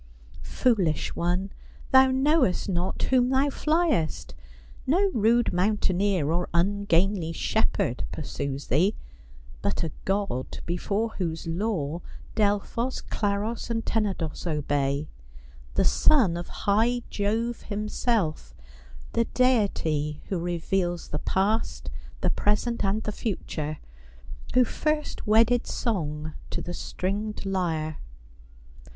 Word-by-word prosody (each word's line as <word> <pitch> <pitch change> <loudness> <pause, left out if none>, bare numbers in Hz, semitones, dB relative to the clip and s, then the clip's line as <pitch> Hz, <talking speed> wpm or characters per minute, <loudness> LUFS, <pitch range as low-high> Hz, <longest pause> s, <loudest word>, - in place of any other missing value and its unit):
Foolish 195 - +1
one, 180 +3 0 0.4
thou 265 0 +7
knowest 265 - +2
not 180 -1 -1
whom 250 -1 +3
thou 265 +2 +3
fliest. 305 - 0 0.5
No 380 +8 +3
rude 230 +1 +3
mountaineer, 185 -3 +1
or 175 +2 0
ungainly 195 -1 +2
shepherd 170 - 0
pursues 140 -2 -4
thee, 180 - +2 0.7
but - - -1
a 160 - -2
god 195 -9 -1
before 200 +6 -1
whose 165 -3 -2
law 170 -3 -1 0.3
Delphos, 215 +4 0
Claros, 210 +3 -2
and 225 -1 -1
Tenedos 190 -7 -1
obey; 145 -1 0 0.7
the - - +3
son 235 - +4
of 175 +1 -4
high 230 +4 +1
Jove 225 +4 -1
him 210 0 -4
self; 170 - -1 0.6
the 230 - +2
deity 165 - +1
who 190 - -1
reveals 175 +1 -1
the 150 - -2
past, 205 +7 0 0.3
the - - +2
present, 225 +3 0
and 205 +2 +1
the 210 - -2
future; 155 -8 -3 0.8
who 255 - +7
first 305 +3 -2
wedded 230 +3 +4
song 155 -8 -2 0.2
to - - -3
the 175 - -5
stringed 205 +5 -3
lyre. 165 -5 -1
200 Hz, 110 wpm, -26 LUFS, 165-230 Hz, 0.8 s, thou